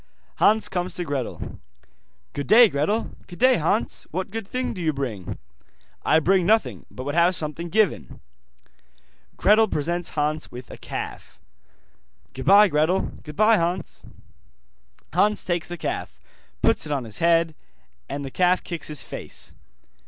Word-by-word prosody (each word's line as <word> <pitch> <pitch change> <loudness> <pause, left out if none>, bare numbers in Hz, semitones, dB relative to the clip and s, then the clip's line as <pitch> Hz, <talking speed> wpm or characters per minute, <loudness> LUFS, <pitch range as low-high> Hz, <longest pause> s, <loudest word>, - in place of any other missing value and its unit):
Hans 215 +1 +4
comes 180 0 -3
to 175 - -1
Gretel. 140 -6 -5 0.7
'Good 140 -2 -4
day, 230 0 +8
Gretel.' 190 +11 -1 0.2
'Good 175 - -11
day, 255 0 +5
Hans, 185 +8 -1
What 185 +3 -4
good 225 -2 -5
thing 255 +3 -2
do 185 - -6
you 160 -2 +1
bring?' 120 -10 -4 0.7
'I 155 - +4
bring 185 +3 +3
nothing, 220 +5 +1
but 130 - -8
would 145 +2 -3
have 170 +2 +4
something 165 +2 -2
given.' 215 -1 0 1.2
Gretel 215 +2 +5
presents 170 +1 -2
Hans 150 +1 -1
with 125 +1 -10
a - - -9
calf. - - -7 0.9
'Goodbye, 200 +10 +5
Gretel.' 160 +5 +1
'Goodbye, 215 +9 +3
Hans.' 175 0 -2 1.1
Hans 210 +1 +2
takes 175 -2 -1
the 175 - -6
calf, 65 - -4 0.4
puts - - +2
it - - -5
on 140 -3 -1
his 110 -3 -5
head, 165 -1 +3 0.6
and 140 0 -4
the 135 - -7
calf 180 +3 +2
kicks 170 -2 -5
his 150 -1 -3
face. - - -7
170 Hz, 145 wpm, -24 LUFS, 150-200 Hz, 1.2 s, day